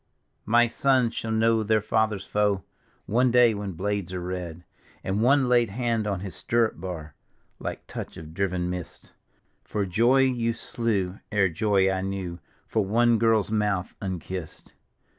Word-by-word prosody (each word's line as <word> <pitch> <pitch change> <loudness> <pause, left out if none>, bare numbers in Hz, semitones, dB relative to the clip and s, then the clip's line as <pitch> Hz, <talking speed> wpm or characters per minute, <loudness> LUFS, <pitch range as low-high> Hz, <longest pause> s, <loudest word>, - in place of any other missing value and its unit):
" - - -46
My 120 0 +7
sons 125 0 +2
shall 115 - -4
know 110 0 +3
their 110 0 +2
father's 105 -2 0
foe 105 -3 +1 0.4
One 125 +4 +3
day 120 -1 +5
when 100 -2 -4
blades 100 +1 -2
are 90 - -2
red." 90 -2 -5 0.4
And 95 +3 -1
one 135 +2 +4
laid 120 -3 +3
hand 115 0 -1
on 100 -3 -2
his 95 -1 -6
stirrup 115 -7 0
bar 80 -5 -6 0.5
Like - - -5
touch - - -7
0' 80 - -9
driven 90 -1 -1
mist, 90 -1 -7 0.3
" - - -44
For 105 -2 -2
joy 120 +8 +3
you 120 -3 +1
slew 105 -5 -2
ere 100 -3 +3
joy 95 +2 +2
I 95 0 -1
knew, 95 -3 -4 0.3
For 110 - 0
one 115 +3 +3
girl's 110 -2 +2
mouth 105 -4 0
unkissed. 95 -3 -6
105 Hz, 160 wpm, -26 LUFS, 95-115 Hz, 0.5 s, My